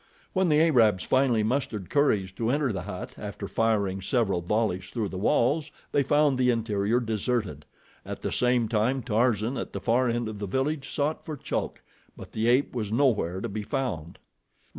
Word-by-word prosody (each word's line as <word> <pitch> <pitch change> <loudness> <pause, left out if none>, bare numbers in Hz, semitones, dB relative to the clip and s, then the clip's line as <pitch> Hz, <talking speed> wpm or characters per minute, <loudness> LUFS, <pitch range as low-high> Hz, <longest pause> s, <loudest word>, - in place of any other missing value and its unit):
When 185 -2 +2
the 150 0 +4
Arabs 115 - +4
finally 130 -5 +2
mustered 110 -6 -2
courage 105 -10 +2
to 115 +4 -2
enter 140 -2 +1
the 95 - -3
hut, - - -7
after - - -6
firing 100 -4 0
several 100 -3 0
volleys 95 0 -1
through 110 -5 -2
the 95 - -5
walls, 145 +9 +2 0.2
they 145 - +3
found 145 -1 +2
the 125 -1 +3
interior 115 -1 +1
deserted. 110 - -2 0.4
At - - -7
the - - -1
same 125 -2 +2
time 120 +4 0
Tarzan, 115 +1 +1
at - - -5
the - - -3
far 125 +2 +2
end 120 -1 -1
of 110 -2 -6
the 100 - -3
village, 135 +6 -1
sought 150 +2 -1
for 155 -4 -6
Chulk; - - -4 0.3
but - - -10
the 110 +1 -1
ape 125 +4 +3
was 105 -4 -2
nowhere 110 -8 +1
to - - -2
be 105 +2 -4
found. 105 - -3
115 Hz, 185 wpm, -27 LUFS, 105-135 Hz, 0.4 s, the